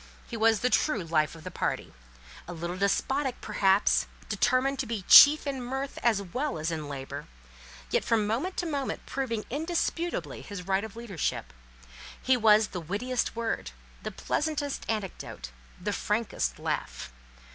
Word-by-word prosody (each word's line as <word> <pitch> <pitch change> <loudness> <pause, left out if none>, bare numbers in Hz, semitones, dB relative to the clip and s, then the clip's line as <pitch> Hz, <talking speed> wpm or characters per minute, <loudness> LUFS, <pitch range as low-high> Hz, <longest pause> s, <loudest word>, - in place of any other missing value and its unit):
He 235 - -7
was 225 -1 +3
the 250 - +1
true 245 - +2
life 160 -1 +1
of 160 - -12
the - - -6
party; - - -2 0.5
a 175 - -6
little 170 +1 -4
despotic, 255 +7 0
perhaps, 200 -1 +2 0.2
determined 270 +1 +2
to 260 - -1
be 220 -4 -3
chief 300 +2 +10
in 275 -2 -3
mirth, 265 +3 -4
as 220 -4 +2
well 200 - -3
as 160 +2 -2
in 155 -3 -4
labour, 135 -1 -6 0.6
yet - - +2
from 225 -2 +2
moment 255 - -2
to 355 - -1
moment 285 -5 -3
proving 230 -5 -3
indisputably 335 +3 -2
his 200 -4 -8
right 195 +1 +1
of 220 -1 -8
leadership. 225 -8 -3 0.7
His 255 -1 +2
was 215 -1 +5
the 180 - -5
wittiest 235 +11 -2
word, 230 -1 -2 0.3
the - - -4
pleasantest 295 -2 -2
anecdote, 195 - -4 0.3
the - - -2
frankest - - -1
laugh. - - -4
225 Hz, 155 wpm, -28 LUFS, 185-270 Hz, 0.7 s, chief